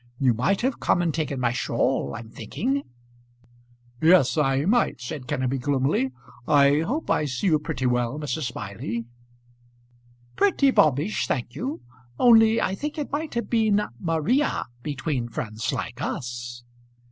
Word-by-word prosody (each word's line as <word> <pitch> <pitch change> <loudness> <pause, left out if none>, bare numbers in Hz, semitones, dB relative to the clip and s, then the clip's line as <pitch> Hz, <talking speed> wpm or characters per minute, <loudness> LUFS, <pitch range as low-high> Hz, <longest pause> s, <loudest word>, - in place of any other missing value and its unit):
You 130 -2 +3
might 125 - +1
have 255 +1 -1
come - - +2
and 165 -3 0
taken 150 -4 -2
my 120 -2 +1
shawl, 70 - 0
I'm 115 - -8
thinking." 255 - -2 1.2
"Yes, 160 -6 +5
I 135 -1 +2
might," 235 +6 +2
said 130 +1 -6
Kenneby 130 +1 -1
gloomily. 135 -1 +1 0.4
"I 145 -1 +5
hope 250 - -2
I 150 - +2
see 135 +6 -3
you 160 -5 +4
pretty 150 -4 -4
well, 125 +2 0
Mrs. 150 -3 -3
Smiley." 105 +2 -5 1.3
"Pretty 335 -9 +3
bobbish, 155 - +2
thank 120 -1 -2
you. 265 +4 -4 0.4
Only 225 -2 +6
I 190 - 0
think 295 +10 -4
it 295 - -4
might 300 0 -3
have 235 - -1
been 220 -3 +3 0.2
Maria 165 - +1 0.2
between 135 -3 -3
friends 110 0 -3
like 120 +2 -5
us." 120 -1 -5
145 Hz, 145 wpm, -25 LUFS, 125-210 Hz, 1.3 s, Only